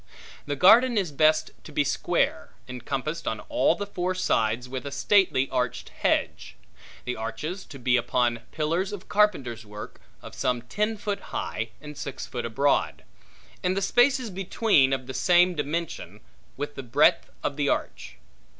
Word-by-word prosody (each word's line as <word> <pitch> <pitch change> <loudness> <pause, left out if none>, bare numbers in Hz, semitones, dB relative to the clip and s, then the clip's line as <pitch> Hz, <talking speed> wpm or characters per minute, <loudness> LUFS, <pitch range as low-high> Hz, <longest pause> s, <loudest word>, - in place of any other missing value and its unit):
The 145 - -1
garden 230 - +6
is 185 -6 0
best 155 +2 +3
to - - -11
be - - +2
square, - - -1
encompassed 135 +5 -4
on 110 - -1
all - - +2
the 205 - -4
four 185 -2 -2
sides 120 -9 0
with 130 0 -5
a - - -5
stately 180 -8 +3
arched 125 -1 -2
hedge. - - -1 0.5
The 125 - -2
arches 150 - -5
to 140 - -11
be 125 0 +2
upon 120 0 +1
pillars 165 +5 -1
of 195 -2 -8
carpenter's 135 - +1
work, 105 0 -10 0.2
of - - -10
some 125 -2 -1
ten 210 - -1
foot 205 -1 -3
high, 115 +1 -4
and 150 +1 -10
six 140 -1 -6
foot 120 -2 -5
broad; 140 +1 +1 0.6
and 185 +1 0
the - - +1
spaces 245 +2 +3
between 190 - +2
of 130 -1 -1
the 130 - -7
same 180 +2 +4
dimension 160 +2 -4 0.4
with 145 0 -4
the 135 - -6
breadth 120 -3 +3
of 140 - -1
the 145 -1 0
arch. - - -3
145 Hz, 160 wpm, -26 LUFS, 125-185 Hz, 0.6 s, garden